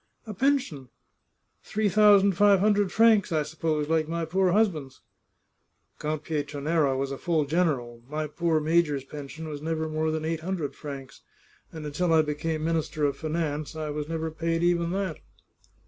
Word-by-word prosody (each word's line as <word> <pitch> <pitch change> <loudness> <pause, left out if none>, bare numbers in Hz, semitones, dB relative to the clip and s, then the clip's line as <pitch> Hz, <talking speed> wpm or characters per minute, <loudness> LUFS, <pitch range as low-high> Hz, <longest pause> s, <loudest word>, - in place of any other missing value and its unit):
" - - -43
A 215 - -6
pension! 250 - 0 0.7
Three 215 0 -1
thousand 200 0 +6
five 200 +1 +4
hundred 205 -1 +2
francs, 220 -2 +4
I 155 -2 +1
suppose, 155 0 -2
like 160 -1 +1
my 170 0 -2
poor 185 +3 +1
husband's." 170 -10 0 0.5
" - - -45
Count 155 0 -3
Pietranera 145 -1 0
was 135 0 -2
a 135 - -5
full 165 -4 +1
general. 140 -7 -1
My 155 +1 -2
poor 160 +1 0
major's 155 -3 +1
pension 150 +3 -8
was 145 -2 -6
never 160 0 -2
more 155 0 -1
than 155 0 -2
eight 165 0 -1
hundred 165 -4 -3
francs, 135 -3 -9 0.5
and 160 -2 -8
until 165 +4 -1
I 160 -1 +5
became 155 +1 -3
Minister 160 -2 0
of 140 - 0
Finance 155 -2 -3
I 155 -1 -3
was 150 +1 -4
never 160 -1 -2
paid 165 +1 -1
even 170 -1 +2
that 190 -4 -2
160 Hz, 170 wpm, -27 LUFS, 150-175 Hz, 0.7 s, thousand